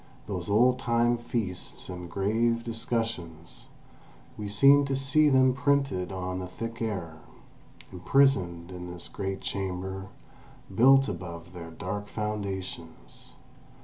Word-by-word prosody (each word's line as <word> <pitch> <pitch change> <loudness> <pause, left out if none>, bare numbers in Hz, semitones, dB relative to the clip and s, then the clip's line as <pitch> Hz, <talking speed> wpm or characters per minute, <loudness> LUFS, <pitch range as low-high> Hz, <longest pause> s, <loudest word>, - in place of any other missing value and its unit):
Those 95 -2 -4
old 125 +5 +4
time 120 -1 +2
feasts 115 -6 -4
and 90 -1 -7
grave 115 +5 +1
discussions 115 -8 -4 0.7
—we 105 -1 -5
seemed 140 +7 +6
to 135 - 0
see 135 +3 +4
them 130 -1 +5
printed 135 -10 +1
on 90 -1 -3
the 90 - -5
thick 115 +5 -6
air, 90 -8 -3 0.7
imprisoned 90 -5 +2
in 90 -1 -7
this 90 -1 -6
great 95 -1 -4
chamber 95 0 -4 0.7
built 135 +6 +6
above 85 -1 -7
their 85 -2 -8
dark 100 +4 -5
foundations. 95 - -5
100 Hz, 115 wpm, -28 LUFS, 90-120 Hz, 0.7 s, seemed